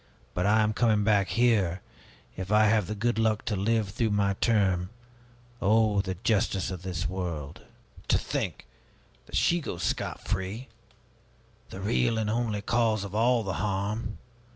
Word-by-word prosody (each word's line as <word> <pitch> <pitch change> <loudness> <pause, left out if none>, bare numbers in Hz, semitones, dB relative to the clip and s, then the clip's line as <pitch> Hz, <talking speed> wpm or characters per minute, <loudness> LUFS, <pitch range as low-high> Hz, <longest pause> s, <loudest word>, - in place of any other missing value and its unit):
But 90 +3 0
I 110 +1 +4
am 110 0 +1
coming 110 -2 +2
back 100 -2 +3
here, 105 -7 +2 0.5
if 95 +2 -5
I 105 0 +5
have 105 -3 +3
the 105 - -3
good 120 +2 0
luck 110 -1 +1
to 105 - -1
live 105 +1 +1
through 110 +3 0
my 100 -1 +1
term. 95 -6 +2 0.7
Oh, 105 0 +3
the 95 -1 -4
justice 100 -4 +1
of 90 -2 -6
this 90 -1 -3
world! 85 -6 -5 0.5
To - - +4
think - - -3 0.6
that - - -7
she 175 - +3
goes 90 - -5
scot - - -3
free, 95 +7 -3 1.0
the 95 - -8
real 115 +3 +1
and 110 -1 0
only 110 -3 -1
cause 110 -2 +1
of 100 -1 -7
all 115 +2 +3
the 95 -2 -3
harm! 105 +2 -2
105 Hz, 160 wpm, -28 LUFS, 95-110 Hz, 1.0 s, I